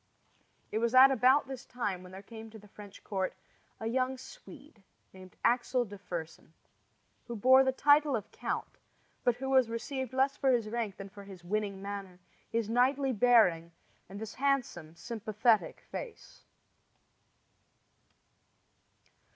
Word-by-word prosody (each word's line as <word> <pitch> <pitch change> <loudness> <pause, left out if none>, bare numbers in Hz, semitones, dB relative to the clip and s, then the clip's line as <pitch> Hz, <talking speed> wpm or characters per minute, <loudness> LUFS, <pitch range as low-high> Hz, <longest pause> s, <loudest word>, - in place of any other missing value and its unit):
It 215 - -1
was 235 +2 0
at 265 +1 +9
about 260 +2 +4
this 265 -1 -7
time 205 -7 -4
when 180 0 -12
there 190 +1 -10
came 225 +1 -10
to 220 - -12
the 210 -1 -16
French 205 -1 -13
court 190 -2 -3 0.4
a 220 - -6
young 255 +3 0
Swede 290 - -14 0.3
named 185 -1 -14
Axel 245 +1 +2
de 205 -1 -10
Fersen, 165 -4 -7 0.7
who 235 - -5
bore 260 +5 +6
the 265 - +2
title 290 +1 +4
of 215 - -5
count, - - -5 0.4
but 245 - +2
who 265 +2 -5
was 260 -3 +4
received 260 +2 -4
less 265 +1 +1
for 270 - +1
his 230 -3 0
rank 225 -4 -3
than 195 0 -8
for 200 0 -12
his 190 -3 -12
winning 200 +1 -3
manner, 200 -2 -6 0.3
his 230 -2 -1
knightly 260 +3 +2
bearing, 195 -8 +3 0.4
and 200 +1 -8
his 220 -1 -7
handsome, 255 - -1
sympathetic 220 +1 0
face. 475 -3 -9
230 Hz, 145 wpm, -31 LUFS, 200-260 Hz, 0.7 s, at